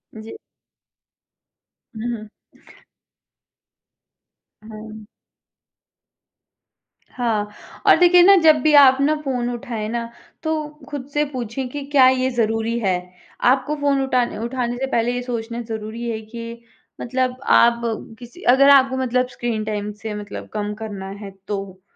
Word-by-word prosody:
जी। 220 - -9 1.6
हुँ, 235 +2 -3
हुँ। 215 0 -11 2.4
हाँ। 215 0 -10 2.0
हाँ, 225 -4 -1 0.4
और - - +8
देखिए 355 0 +6
ना 395 +2 +8
जब 315 -1 +7
भी 310 -1 +3
आप 265 -1 +6
ना 300 +2 +3
फ़ोन 250 -4 -2
उठाएँ 230 -2 -5
ना, 235 0 -3 0.3
तो 315 -1 -1 0.2
खुद 280 -2 -6
से 295 - +2
पूछें 250 +1 -4
कि 285 +2 -6
क्या 275 -2 +5
ये 260 0 +1
ज़रूरी 225 0 0
है? 195 -5 +1 0.5
आपको 270 +4 +2
फ़ोन 280 -1 +2
उठाने 250 -5 0
उठाने 240 +1 -3
से 265 - -1
पहले 235 +1 +1
ये 245 - -2
सोचना 235 -1 -4
ज़रूरी 225 +1 -5
है 220 - -3
कि 230 +1 -9 0.4
मतलब 255 +1 -1 0.2
आप 235 0 +5 0.4
किसी 245 +8 -13
अगर 275 +2 +5
आपको 265 -2 +5
मतलब 250 -1 0
स्क्रीन 240 -3 -3
टाइम 210 -1 -3
से 220 -1 -4
मतलब 205 -1 -7
कम 210 -1 -3
करना 200 -3 -6
है 200 -1 -8 0.2
तो, 195 -2 -5
240 Hz, 135 wpm, -21 LUFS, 220-260 Hz, 2.4 s, और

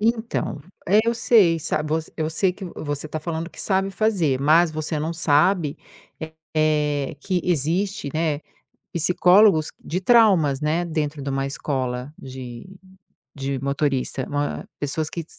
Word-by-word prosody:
Então 225 -8 -1 0.3
é, 205 +4 +5
eu 235 0 +1
sei, 205 -8 +4
sa 155 0 -1
voc 155 +1 -2
eu 155 -1 -1
sei 180 +4 +1
que 190 +1 -9
vo 175 - -8
você 145 +1 -3
tá 155 +1 -4
falando 165 +1 -4
que - - -9
sabe 195 0 +1
fazer, 180 -11 +1
mas 160 +3 +4
você 155 0 -2
não 160 +3 -2
sabe, 160 0 +2 0.8
eh, 150 -1 +1
que 185 -2 -1
existe, 175 +1 0
né, 155 -2 0 0.5
psicólogos 180 0 +4 0.2
de 180 +4 -2
traumas, 190 - +4
né, 160 +3 0
dentro 155 -3 -3
de 140 - -3
uma 135 0 -1
escola 130 -1 -3
de 130 -1 -9 0.7
de 135 -1 -3
motorista. 140 -2 -1
Uma 145 0 -2
pessoas 150 +2 -2
que 170 -2 -5
155 Hz, 150 wpm, -23 LUFS, 145-180 Hz, 0.8 s, é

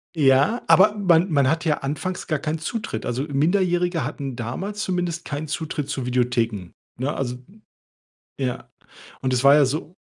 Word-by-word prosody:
Ja, 145 - +3
aber 190 +6 +6
man 180 -3 +3
man 140 -3 +3
hat 160 +4 0
ja 150 -2 +2
anfangs 155 +7 -4
gar 155 -3 -1
keinen 155 +2 -2
Zutritt. 220 +8 -4
Also, 125 +3 -2
Minderjährige 175 +2 +1
hatten 135 -3 -5
damals 185 - -5
zumindest 175 -4 -2
keinen 150 0 -5
Zutritt 150 -1 -3
zu 135 -3 -3
Videotheken, 120 -6 -1 0.3
ne? 140 +4 -1
Also 125 -2 -3 1.0
ja. 125 -2 -3 0.5
Und 130 -1 -1
es 125 +1 +1
war 140 +1 +8
ja 150 -1 +6
so 155 +5 -4
150 Hz, 160 wpm, -23 LUFS, 130-175 Hz, 1.0 s, war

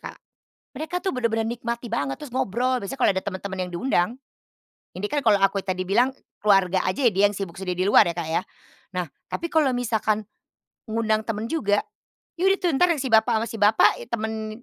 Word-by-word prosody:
Kak. - - -9 0.6
Mereka 315 +6 -3
tuh 380 -4 -2
bener-bener 225 -2 0
nikmati 235 0 -4
banget, 145 -12 -2
terus 255 -4 -9
ngobrol 255 +1 0
biasanya 200 +7 -5
kalau - - +5
ada 190 - -1
teman-teman 190 0 -5
yang 180 - -5
diundang 175 0 +1 0.9
ini 195 +3 -3
kan 295 - +1
kalau 210 -4 +4
aku 195 0 +3
ya 190 - -2
tadi 185 - -2
bilang 240 +7 +3 0.3
keluarga 195 -3 +3
aja 195 +9 -1
ya - - +3
dia 195 - +3
yang 205 - -6
sibuk 190 -4 -5
sendiri 180 -1 -2
di 195 - 0
luar 205 -1 +6
ya, - - -11
Kak, 170 -2 -3
ya. 165 - +1 0.6
Nah, 180 - 0 0.3
tapi 335 - -2
kalau 305 -4 +3
misalkan, 220 -3 0 0.7
ngundang 220 -1 +1
temen 220 0 -3
juga, 205 -11 +1 0.6
ya 365 - +2
udah 390 - +3
tuh 350 - +2
entar 355 +6 +4 0.2
si 270 - -3
bapak 225 +1 +4
ama - - -2
si 225 - -6
bapak, 210 +1 +4
e - - -10
temen 220 0 -4
220 Hz, 210 wpm, -24 LUFS, 195-245 Hz, 0.9 s, luar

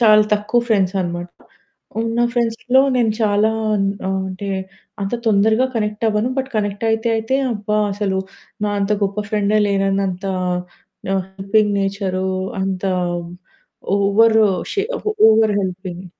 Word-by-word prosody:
చాలా 215 -2 +6
తక్కువ 215 +3 +1
ఫ్రెండ్స్ 195 -4 +2
అనమాట. 175 0 -3 0.7
ఉన్న 230 +1 -2
ఫ్రెండ్స్‌లో 245 +2 +2
నేను 230 -3 +2
చాలా 210 +1 +3 0.3
అన్ 195 -1 +1 0.2
ఆహ్, 190 0 0
అంటే 190 +2 -6 0.5
అంత 195 +5 -2
తొందరగా 220 +4 +3
కనెక్ట్ 210 0 -2
అవ్వను. 215 +3 0
బట్ 265 0 -2
కనెక్ట్ 205 +1 -2
అయితే 225 +1 0
అయితే, 225 +4 0 0.2
అబ్బా! 210 0 -1 0.2
అసలు 195 -2 -1 0.5
నా - - 0
అంత 200 +2 +1
గొప్ప 200 +1 -3
ఫ్రెండే 210 0 +2
లేనన్నంత 195 -1 0 0.8
నా - - 0 0.2
హెల్పింగ్ 205 +1 +1
నేచరూ, 195 -1 -1 0.4
అంత 190 -1 -2 1.1
ఓవరు 215 +2 +4 0.3
షే 400 - +1 0.2
ఆహ్, 425 - -2 0.2
ఓవర్ 220 -1 +3
హెల్పింగ్ 185 -1 -5
210 Hz, 130 wpm, -19 LUFS, 195-220 Hz, 1.1 s, చాలా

